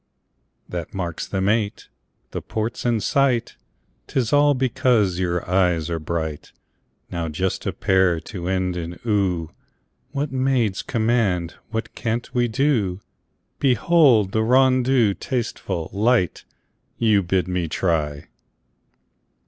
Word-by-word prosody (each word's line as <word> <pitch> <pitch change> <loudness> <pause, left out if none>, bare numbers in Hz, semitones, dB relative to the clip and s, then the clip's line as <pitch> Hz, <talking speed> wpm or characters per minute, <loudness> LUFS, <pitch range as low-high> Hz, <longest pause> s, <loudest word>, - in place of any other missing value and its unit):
That 85 0 -6
makes 85 -4 -4
them 95 -1 -1
eight. 105 -1 0 0.4
The - - -4
port's 110 +3 -3
in 115 -3 +1
sight 130 +1 +1 0.5
'Tis 125 -2 -1
all 145 0 +5
because 125 -8 +2
your 90 -1 -1
eyes 90 -3 +1
are 85 - -1
bright! 80 -1 -4 0.6
Now 85 -2 -3
just 90 +5 -2
a - - +1
pair 95 -3 +2
to 90 0 -7
end 95 -1 0
in 85 0 -5
"oo" 95 -7 0 0.6
When 140 -2 -2
maids 120 -8 +1
command, 110 -7 0 0.2
what 110 0 -4
can't 120 +1 -3
we 120 -2 +2
do? 115 -7 +1 0.6
Behold! 130 - +4
the 110 - +1
rondeau, 130 -2 +4
tasteful, 100 - -3
light, 105 -3 +1 0.5
You 110 -3 +3
bid 90 -1 0
me 90 -2 -1
try! 75 -4 -1
100 Hz, 120 wpm, -22 LUFS, 90-120 Hz, 0.6 s, all